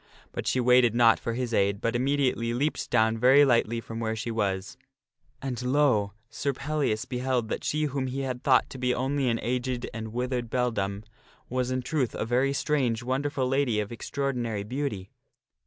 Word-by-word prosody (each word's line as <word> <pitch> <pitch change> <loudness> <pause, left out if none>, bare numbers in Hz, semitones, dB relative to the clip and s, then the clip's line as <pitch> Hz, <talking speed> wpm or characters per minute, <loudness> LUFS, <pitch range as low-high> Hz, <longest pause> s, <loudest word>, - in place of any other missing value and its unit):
But - - -5
she 130 - +2
waited 125 -2 +4
not 115 -2 +5
for 115 - -3
his 120 -1 -3
aid, 100 -1 +2
but 115 +2 -1
immediately 125 -3 +1
leaped 145 +5 -1
down 110 -1 +2
very 135 +4 +7
lightly 120 -3 +2
from 115 0 -7
where 110 -1 -1
she 115 +2 -4
was. 105 +2 -2 0.7
And, 130 -2 -3
lo! 125 -6 +2
Sir 140 +3 -2
Pellias 140 -6 -1
beheld 125 -2 -1
that - - -3
she 155 +1 0
whom 140 -2 -1
he 135 +2 -3
had 130 -2 -3
thought 130 -2 +4
to 130 - -8
be 125 0 +1
only 135 +1 0
an 115 -1 0
aged 125 0 -2
and 110 -1 -5
withered 125 0 -2
beldame 105 -5 -1 0.5
was, 125 0 -1
in 130 0 -1
truth, 130 -4 -1
a - - -2
very 125 +4 +2
strange, 135 -5 0
wonderful 130 +1 -1
lady 130 -4 +1
of 105 0 -3
extraordinary 120 -4 -2
beauty. 110 -5 -4
125 Hz, 180 wpm, -27 LUFS, 115-135 Hz, 0.7 s, very